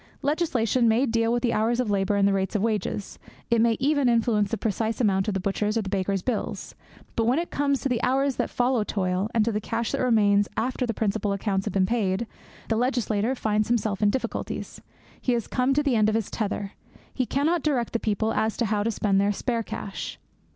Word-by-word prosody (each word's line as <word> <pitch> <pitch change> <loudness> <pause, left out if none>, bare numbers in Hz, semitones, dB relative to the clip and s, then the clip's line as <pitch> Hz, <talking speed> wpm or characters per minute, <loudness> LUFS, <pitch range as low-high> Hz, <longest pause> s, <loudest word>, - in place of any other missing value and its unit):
Legislation 260 -6 +1
may 230 +4 +3
deal 230 -1 +1
with 240 +1 0
the 235 -2 +2
hours 230 +3 +1
of 240 -5 0
labour 200 0 +1
and 200 0 +3
the 200 - +2
rate 190 +2 -1
of 205 - +1
wages. 215 -2 -2 0.3
It 230 -1 +4
may 230 -1 +3
even 285 -1 +2
influence 225 -3 +2
the 225 - -1
precise 220 +2 -1
amount 195 -4 +2
of 210 - -1
the - - 0
butcher's 205 +3 -1
or 225 - 0
the 195 - -5
baker's 195 -1 -1
bills. 245 -5 -3 0.4
But 225 - +1
when 250 +4 +3
it 340 +1 -2
comes 280 -1 0
to 275 - -1
the 245 -2 0
hours 265 +2 +1
that - - 0
follow 245 -2 +1
toil, 190 0 -1
and 220 -2 +3
to 230 - +1
the 210 0 -2
cash 230 +2 -2
that - - -1
remains 205 -5 +3
after 250 +2 -1
the 230 - -2
principal 210 -1 0
accounts 195 -1 -1
have 205 - -2
been 190 -1 +4
paid, 205 -1 0 0.4
the 225 - 0
legislator 240 -1 0
finds 215 -3 0
himself 215 -4 0
in 210 - +4
difficulties. 260 +5 -4 0.4
He 250 - +1
has 235 -2 -1
come 255 +1 0
to 295 - +2
the 275 -4 +1
end 215 -1 +4
of 215 - 0
his 225 -3 -1
tether. 205 -2 -3 0.4
He 255 -2 -1
cannot 315 +5 +1
direct 265 -6 0
the 230 - +1
people 220 +1 0
as 220 0 0
to 235 - +1
how 210 -1 0
to 220 - 0
spend 200 -3 +1
their 200 +1 +2
spare 230 +3 -1
cash. 200 -2 -6
225 Hz, 230 wpm, -25 LUFS, 205-245 Hz, 0.4 s, It